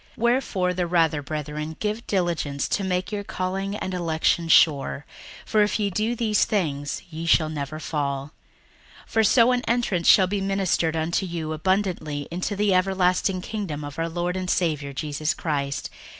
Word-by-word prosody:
61:001:010 -, -, -28 dB
Wherefore 235 Hz, -7 st, +1 dB
the 180 Hz, -1 st, -1 dB
rather, 165 Hz, -3 st, +2 dB
brethren, 150 Hz, +1 st, -5 dB
give 215 Hz, +3 st, -3 dB
diligence 170 Hz, -7 st, -1 dB
to 200 Hz, -, 0 dB
make 185 Hz, +1 st, -1 dB
your 205 Hz, -1 st, -3 dB
calling 195 Hz, +1 st, -3 dB
and 190 Hz, -2 st, -4 dB
election 165 Hz, -1 st, +1 dB
sure: 145 Hz, -3 st, +4 dB, 0.4 s
for 215 Hz, -, +2 dB
if 210 Hz, +1 st, +1 dB
ye 205 Hz, -1 st, 0 dB
do 215 Hz, +5 st, 0 dB
these 220 Hz, -3 st, +2 dB
things, 145 Hz, -8 st, -1 dB
ye 165 Hz, +1 st, -5 dB
shall 155 Hz, -1 st, +4 dB
never 155 Hz, 0 st, -5 dB
fall: 140 Hz, -2 st, -3 dB, 0.7 s
61:001:011 -, -, -23 dB
For 225 Hz, -, +3 dB
so 230 Hz, +3 st, +5 dB
an 250 Hz, -1 st, +1 dB
entrance 230 Hz, -8 st, +1 dB
shall 190 Hz, -, +7 dB
be 200 Hz, +2 st, -2 dB
ministered 195 Hz, -4 st, 0 dB
unto 165 Hz, +4 st, 0 dB
you 160 Hz, -2 st, -4 dB
abundantly 160 Hz, -4 st, -1 dB
into 185 Hz, +4 st, -2 dB
the 205 Hz, -1 st, +2 dB
everlasting 185 Hz, 0 st, +2 dB
kingdom 185 Hz, -8 st, -4 dB
of 145 Hz, +2 st, -7 dB
our 165 Hz, 0 st, -1 dB
Lord 175 Hz, +2 st, -2 dB
and 185 Hz, -1 st, -3 dB
Saviour 150 Hz, -6 st, 0 dB
Jesus 150 Hz, +2 st, -2 dB
Christ. 140 Hz, -3 st, -2 dB
175 Hz, 170 wpm, -24 LUFS, 155-195 Hz, 0.7 s, shall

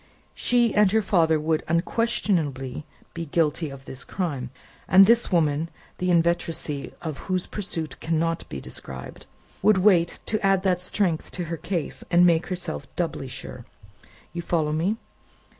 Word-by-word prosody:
She 240 Hz, -2 st, +2 dB
and 210 Hz, -2 st, +4 dB
her 220 Hz, -, +4 dB
father 165 Hz, -5 st, +3 dB
would 155 Hz, +1 st, +1 dB
unquestionably 165 Hz, -, 0 dB, 0.3 s
be 170 Hz, -1 st, -5 dB
guilty 160 Hz, 0 st, +1 dB
of 135 Hz, -1 st, -11 dB
this 130 Hz, -, -5 dB
crime, 145 Hz, -10 st, -3 dB, 0.4 s
and 190 Hz, +1 st, +8 dB
this 235 Hz, +2 st, +4 dB
woman 160 Hz, -2 st, +2 dB, 0.3 s
(the 180 Hz, -, 0 dB
inveteracy 165 Hz, -4 st, 0 dB
of 155 Hz, -4 st, -4 dB
whose 185 Hz, -1 st, +1 dB
pursuit 170 Hz, -6 st, -5 dB
cannot 165 Hz, +1 st, -1 dB
be 70 Hz, -, -5 dB
described) 65 Hz, -1 st, -9 dB, 0.3 s
would 215 Hz, -2 st, +5 dB
wait 180 Hz, -3 st, +3 dB
to 215 Hz, -, -1 dB
add 195 Hz, -1 st, +3 dB
that 180 Hz, -2 st, +2 dB
strength 180 Hz, -3 st, 0 dB
to 180 Hz, -, -3 dB
her 165 Hz, 0 st, -4 dB
case, 170 Hz, -3 st, -3 dB
and 175 Hz, 0 st, +6 dB
make 170 Hz, -1 st, +3 dB
herself 180 Hz, -6 st, -4 dB
doubly 165 Hz, -6 st, -2 dB
sure. 125 Hz, -1 st, -8 dB, 0.7 s
You 170 Hz, -, -3 dB
follow 160 Hz, -3 st, 0 dB
me?" 180 Hz, +8 st, 0 dB
170 Hz, 150 wpm, -25 LUFS, 155-185 Hz, 0.7 s, and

